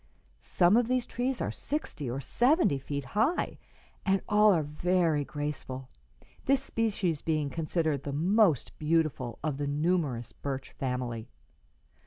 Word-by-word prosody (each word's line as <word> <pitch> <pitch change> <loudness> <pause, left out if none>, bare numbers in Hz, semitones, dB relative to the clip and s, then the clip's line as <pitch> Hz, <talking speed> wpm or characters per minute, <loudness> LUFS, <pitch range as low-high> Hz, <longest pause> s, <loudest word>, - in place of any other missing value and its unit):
Some 180 +4 +3
of 240 -1 +3
these 255 -1 +1
trees 250 +1 -2
are - - -1
sixty 275 - -4
or 125 +3 -3
seventy 245 - +2
feet 140 0 -4
high, 235 - +1 0.4
and 195 0 +2
all 210 0 +6
are 165 -5 +2
very 160 0 +1
graceful, 140 -3 -5 0.6
this 270 0 +3
species 205 - -1
being 155 -3 0
considered 160 -3 -1
the 140 - -5
most 175 - +3
beautiful 155 -7 0
of 150 -3 -1
the 145 0 -2
numerous 145 -5 0
birch 135 -1 -5
family. 125 -3 -3
155 Hz, 135 wpm, -29 LUFS, 140-210 Hz, 0.6 s, all